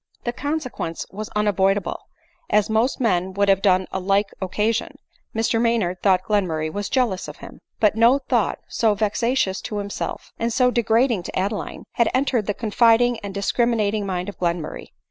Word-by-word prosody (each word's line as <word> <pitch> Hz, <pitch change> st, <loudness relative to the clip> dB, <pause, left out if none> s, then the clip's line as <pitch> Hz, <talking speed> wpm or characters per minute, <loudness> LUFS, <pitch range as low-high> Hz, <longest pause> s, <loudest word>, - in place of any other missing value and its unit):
The 240 Hz, -, -2 dB
consequence 260 Hz, -, -4 dB
was 215 Hz, +2 st, -6 dB
unavoidable; 195 Hz, -2 st, +1 dB, 0.5 s
as 210 Hz, +1 st, +2 dB
most 225 Hz, +4 st, +1 dB
men 190 Hz, -6 st, +1 dB
would 200 Hz, +1 st, +1 dB
have 195 Hz, -1 st, +4 dB
done 185 Hz, -2 st, +3 dB
on 190 Hz, -, -3 dB
a -, -, -10 dB
like 200 Hz, +1 st, +1 dB
occasion, 210 Hz, +5 st, -1 dB, 0.4 s
Mr 225 Hz, +1 st, +1 dB
Maynard 220 Hz, -7 st, 0 dB
thought 185 Hz, -2 st, +3 dB
Glenmurray 165 Hz, -7 st, 0 dB
was 205 Hz, 0 st, -3 dB
jealous 240 Hz, -8 st, 0 dB
of -, -, -9 dB
him. -, -, -12 dB, 0.2 s
But 210 Hz, -1 st, +3 dB
no 235 Hz, +4 st, +5 dB
thought 275 Hz, -, 0 dB
so 220 Hz, -3 st, +1 dB
vexatious 215 Hz, -1 st, 0 dB
to 215 Hz, -4 st, -5 dB
himself, 200 Hz, 0 st, -5 dB
and 230 Hz, +1 st, 0 dB
so 250 Hz, +1 st, +3 dB
de 240 Hz, -, +1 dB
ADELINE -, -, -15 dB
MOWBRAY. 230 Hz, +3 st, +6 dB
81 -, -, +3 dB
grading 220 Hz, -9 st, -2 dB
to -, -, -3 dB
Adeline, 200 Hz, +3 st, -3 dB
had 235 Hz, -, +2 dB
entered 255 Hz, -5 st, +1 dB
the 205 Hz, -, -1 dB
confiding 235 Hz, +1 st, +3 dB
and 200 Hz, -2 st, -6 dB
dis* 200 Hz, 0 st, -1 dB
criminating 215 Hz, -4 st, +1 dB
mind 180 Hz, -1 st, -2 dB
of 205 Hz, -, -8 dB
Glenmurray. 170 Hz, -3 st, -2 dB
210 Hz, 190 wpm, -22 LUFS, 195-235 Hz, 0.5 s, MOWBRAY